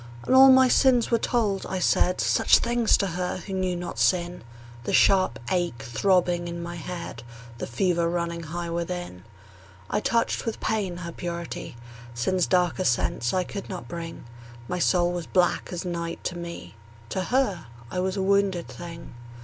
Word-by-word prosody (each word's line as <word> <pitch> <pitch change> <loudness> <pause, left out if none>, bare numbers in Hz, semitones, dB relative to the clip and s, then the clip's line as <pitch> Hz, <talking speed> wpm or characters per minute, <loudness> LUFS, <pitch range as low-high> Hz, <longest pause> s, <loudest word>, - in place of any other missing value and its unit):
And - - +1
all 265 +1 +9
my 260 0 +7
sins 250 -2 +4
were 230 - +3
told; 210 -6 0
I 190 - -2
said 180 0 +2
Such - - +4
things 235 -1 +2
to 200 - 0
her 180 0 -2
who 190 +2 -7
knew 185 -1 0
not 175 0 -5
sin 175 -3 +1 0.4
The - - -3
sharp 185 -10 +4
ache 175 -10 -1
throbbing 175 - +1
in 170 0 -5
my 170 0 -6
head, 170 -8 -6 0.4
The - - -4
fever 170 +5 +1
running 170 -1 -2
high 170 +2 -5
within. 170 - -4 0.7
I - - +2
touched 230 +2 0
with 225 - -4
pain 205 -5 -1
her 170 - -5
purity; 170 -5 -6 0.4
Sin's 180 +10 +1
darker 180 0 +2
sense 120 -3 +1
I 185 - +1
could 195 +2 -7
not 185 -3 -6
bring: 165 -1 -7 0.4
My 180 - -2
soul 175 0 +3
was 175 -2 -4
black 180 -2 +1
as 175 0 -4
night 170 -1 -4
to 180 - -3
me: 170 -7 -7 0.4
To 185 +6 -2
her 225 - 0 0.2
I 180 - -2
was 190 +2 -1
a 190 - 0
wounded 195 -3 +1
thing. 170 -1 -9
180 Hz, 175 wpm, -26 LUFS, 170-195 Hz, 0.7 s, all